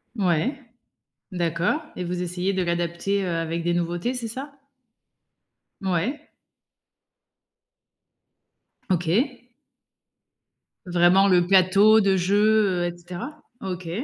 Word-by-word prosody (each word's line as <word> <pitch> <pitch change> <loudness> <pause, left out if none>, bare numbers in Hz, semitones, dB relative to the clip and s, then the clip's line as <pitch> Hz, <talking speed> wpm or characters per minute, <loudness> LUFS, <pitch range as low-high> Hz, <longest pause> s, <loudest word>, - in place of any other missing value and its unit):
Ouais. 195 - 0 0.7
D'accord, 175 - -1 0.2
et 180 - -4
vous 180 +1 -3
essayez 180 +2 -2
de 190 - 0
l'adapter, 170 +3 -1
heu, 185 - -3
avec 165 0 -3
des 175 +1 0
nouveautés, 175 +8 -2
c'est 235 -2 -5
ça? 270 +5 -7 1.3
Ouais. 200 - -2 2.6
OK. 200 - 0 1.4
Vraiment, 180 +2 +4
le 180 -2 +4
plateau 195 +4 +5
de 195 -1 +2
jeu, 200 0 +2
heu, - - 0
et 175 0 -4
cetera? 180 - -8 0.2
OK. 180 -3 -5
185 Hz, 105 wpm, -24 LUFS, 175-210 Hz, 2.6 s, plateau